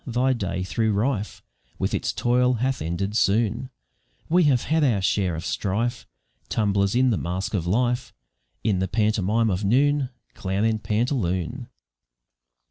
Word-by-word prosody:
thy 125 Hz, +2 st, +2 dB
day, 95 Hz, -5 st, -3 dB
though 110 Hz, +4 st, -1 dB
rife 105 Hz, +1 st, -1 dB, 0.3 s
With -, -, -1 dB
its -, -, 0 dB
toil, 125 Hz, +1 st, +2 dB
hath 130 Hz, +3 st, -1 dB
ended 85 Hz, +6 st, -2 dB
soon; 115 Hz, +4 st, +1 dB, 0.6 s
We 175 Hz, +1 st, +4 dB
have 130 Hz, -5 st, +3 dB
had 160 Hz, +1 st, +1 dB
our 120 Hz, -8 st, +3 dB
share 95 Hz, -2 st, +1 dB
of 80 Hz, +2 st, -6 dB
strife, 115 Hz, +5 st, -2 dB, 0.4 s
Tumblers 100 Hz, -1 st, +1 dB
in 130 Hz, 0 st, +4 dB
the 105 Hz, -, 0 dB
mask 90 Hz, +5 st, -3 dB
of 85 Hz, -5 st, -1 dB
life, 120 Hz, +3 st, 0 dB, 0.5 s
In 100 Hz, -4 st, +1 dB
the 95 Hz, -, 0 dB
pantomime 110 Hz, +2 st, +1 dB
of 95 Hz, +3 st, -2 dB
noon 135 Hz, +5 st, +2 dB, 0.2 s
Clown 95 Hz, +2 st, -2 dB
and 110 Hz, -1 st, 0 dB
pantaloon. 110 Hz, -, -1 dB
110 Hz, 145 wpm, -24 LUFS, 95-125 Hz, 0.6 s, We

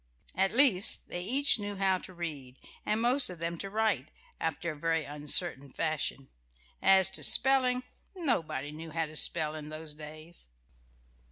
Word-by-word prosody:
At 190 Hz, +1 st, 0 dB
least, 230 Hz, -7 st, +4 dB
they 175 Hz, -, -3 dB
each 260 Hz, +6 st, +3 dB
knew 205 Hz, 0 st, -6 dB
how 190 Hz, -1 st, 0 dB
to -, -, -10 dB
read, 145 Hz, -7 st, -6 dB, 0.3 s
and 215 Hz, +1 st, 0 dB
most 250 Hz, +2 st, +4 dB
of 180 Hz, -, -9 dB
them 170 Hz, 0 st, -5 dB
to 195 Hz, -, -6 dB
write, 220 Hz, +2 st, -1 dB, 0.3 s
after 170 Hz, -, -3 dB
a -, -, -9 dB
very 165 Hz, +1 st, -2 dB
uncertain 145 Hz, -1 st, +2 dB
fashion. 155 Hz, -4 st, -4 dB, 0.5 s
As 190 Hz, -1 st, +4 dB
to -, -, -4 dB
spelling, 255 Hz, -1 st, +4 dB, 0.3 s
nobody 165 Hz, -, -2 dB
knew 160 Hz, +2 st, -10 dB
how 165 Hz, +1 st, -3 dB
to 155 Hz, 0 st, -12 dB
spell 155 Hz, 0 st, +2 dB
in 150 Hz, -1 st, -9 dB
those 155 Hz, 0 st, -6 dB
days.... 155 Hz, -, -11 dB
170 Hz, 160 wpm, -29 LUFS, 155-210 Hz, 0.5 s, least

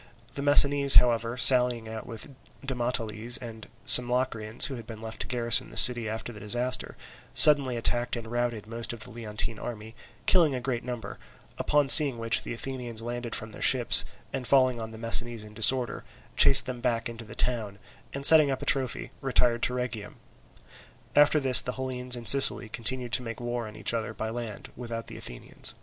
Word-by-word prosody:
The 140 Hz, -, -7 dB
Messinese, 140 Hz, -1 st, +4 dB
however, 120 Hz, 0 st, +2 dB
sallying 125 Hz, -2 st, +1 dB
out 110 Hz, 0 st, -10 dB
with 115 Hz, +3 st, -11 dB, 0.4 s
Demoteles 120 Hz, -3 st, -1 dB
and 115 Hz, -3 st, -12 dB, 0.2 s
some 125 Hz, -1 st, +8 dB
Locrians 120 Hz, -3 st, -1 dB
who 140 Hz, -, -6 dB
had 115 Hz, -3 st, -11 dB
been 110 Hz, -2 st, -11 dB
left 110 Hz, 0 st, -10 dB
to -, -, -2 dB
garrison 120 Hz, -2 st, +2 dB
the -, -, -10 dB
city 120 Hz, -3 st, +5 dB
after 110 Hz, +2 st, -8 dB
the 105 Hz, -, -13 dB
disaster, 120 Hz, +5 st, -5 dB, 0.4 s
suddenly 140 Hz, -5 st, +7 dB
attacked 120 Hz, +1 st, -3 dB
and 115 Hz, -1 st, -8 dB
routed 120 Hz, -2 st, -5 dB
most 115 Hz, +1 st, -5 dB
of 115 Hz, -, -12 dB
the -, -, -9 dB
Leontine 110 Hz, -1 st, -4 dB
army, 110 Hz, -2 st, -10 dB, 0.3 s
killing 165 Hz, -7 st, +1 dB
a -, -, -5 dB
great 125 Hz, -1 st, -5 dB
number; 120 Hz, -3 st, -9 dB, 0.4 s
upon 145 Hz, -1 st, -1 dB
seeing 140 Hz, -2 st, +8 dB
which 115 Hz, -1 st, -1 dB
the -, -, -9 dB
Athenians 120 Hz, -2 st, -7 dB
landed 120 Hz, 0 st, -6 dB
from 110 Hz, 0 st, -3 dB
their -, -, -14 dB
ships, 125 Hz, -3 st, +2 dB, 0.3 s
and 130 Hz, -3 st, -6 dB
falling 130 Hz, -3 st, +1 dB
on 110 Hz, -, -8 dB
the 110 Hz, -, -13 dB
Messinese 115 Hz, 0 st, -1 dB
in 105 Hz, 0 st, -15 dB
disorder 120 Hz, +3 st, +1 dB, 0.3 s
chased -, -, +5 dB
them 125 Hz, -2 st, -8 dB
back 115 Hz, 0 st, -3 dB
into 115 Hz, 0 st, -11 dB
the 110 Hz, -1 st, -14 dB
town, 110 Hz, -5 st, -2 dB, 0.3 s
and 140 Hz, 0 st, -1 dB
setting 155 Hz, -2 st, +7 dB
up 135 Hz, -, -5 dB
a -, -, -8 dB
trophy 130 Hz, -1 st, -2 dB
retired 125 Hz, -3 st, -1 dB
to 125 Hz, -, -2 dB
Rhegium. 115 Hz, -5 st, -7 dB, 1.0 s
After 150 Hz, +1 st, +3 dB
this 130 Hz, -4 st, +2 dB
the 125 Hz, -, -6 dB
Hellenes 125 Hz, -1 st, -4 dB
in 120 Hz, -1 st, -11 dB
Sicily 135 Hz, -2 st, +4 dB
continued 120 Hz, +1 st, -4 dB
to 125 Hz, -, +2 dB
make 115 Hz, -2 st, -9 dB
war 120 Hz, -1 st, -6 dB
on 105 Hz, -, -13 dB
each -, -, -3 dB
other 110 Hz, -1 st, -6 dB
by 110 Hz, 0 st, -6 dB
land, 115 Hz, -3 st, -9 dB
without 115 Hz, -2 st, -8 dB
the -, -, -11 dB
Athenians. -, -, -4 dB
120 Hz, 190 wpm, -25 LUFS, 115-125 Hz, 1.0 s, some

